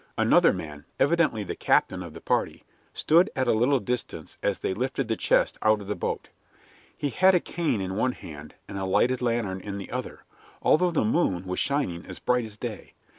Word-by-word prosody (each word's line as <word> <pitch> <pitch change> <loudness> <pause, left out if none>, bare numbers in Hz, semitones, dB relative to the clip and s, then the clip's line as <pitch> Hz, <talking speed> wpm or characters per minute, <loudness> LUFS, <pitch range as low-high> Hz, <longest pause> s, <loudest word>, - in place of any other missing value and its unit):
Another - - +5
man, 75 -1 -7
evidently 150 -8 +2
the - - -5
captain 95 - +2
of 85 -3 -9
the - - -9
party, - - -1 0.3
stood 170 +6 +3
at 130 -1 0
a - - +4
little 125 +5 +3
distance 125 +3 -5
as 100 - 0
they - - -2
lifted 130 +4 -2
the 110 - 0
chest - - +1
out 110 0 +3
of 100 - -9
the 105 +1 -3
boat. - - -3 0.7
He 145 -2 -2
had 185 +4 +5
a - - +5
cane 165 -10 -1
in 95 0 -3
one 125 +4 +1
hand 75 -6 -11
and 100 - -6
a 95 - -2
lighted 125 +7 +2
lantern 115 -6 -1
in 100 0 -5
the 100 - -8
other, 125 +1 -5 0.4
although 180 +3 +4
the 165 -9 +1
moon 95 - +1
was 90 0 -3
shining 140 -13 -1
as 90 - -8
bright 125 -1 +1
as 105 -1 -10
day. 110 -2 -7
110 Hz, 205 wpm, -26 LUFS, 95-135 Hz, 0.7 s, Another